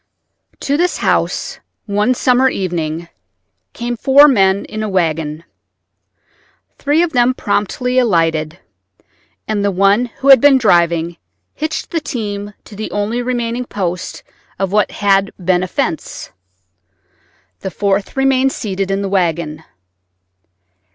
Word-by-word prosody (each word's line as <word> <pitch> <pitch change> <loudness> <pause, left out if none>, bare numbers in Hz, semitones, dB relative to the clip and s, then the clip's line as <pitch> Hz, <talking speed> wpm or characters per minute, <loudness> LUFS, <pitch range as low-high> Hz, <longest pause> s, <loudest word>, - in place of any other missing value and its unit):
To 280 +1 0
this 350 +2 +1
house, - - -1 0.3
one 210 +4 +1
summer 255 +1 +3
evening, 170 -5 -3 0.7
came 240 0 -3
four 275 +5 +6
men 195 -7 +3
in 215 - -6
a 215 - -2
wagon. 160 -4 -1 1.4
Three 295 +4 +2
of 335 -2 -2
them 250 0 +3
promptly 210 +5 0
alighted, 165 -7 +1 0.9
and 210 -2 -1
the 200 - +2
one 200 +5 +3
who 270 +4 -2
had 270 -4 +9
been 285 -2 +6
driving 170 -6 +2 0.4
hitched 310 +1 -4
the 330 - 0
team 205 -6 -5
to 210 - -13
the 215 +2 -5
only 210 +4 -2
remaining 240 -1 -2
post 180 -5 -4 0.3
of 195 -1 -2
what 210 0 +2
had 195 -1 +1
been 180 -1 +1
a 185 - -2
fence. 170 -2 -4 1.3
The - - -4
fourth 200 +4 -1
remained 270 0 +3
seated 195 -2 -3
in 195 +1 -1
the - - -2
wagon. 165 -4 -1
205 Hz, 130 wpm, -16 LUFS, 180-250 Hz, 1.4 s, had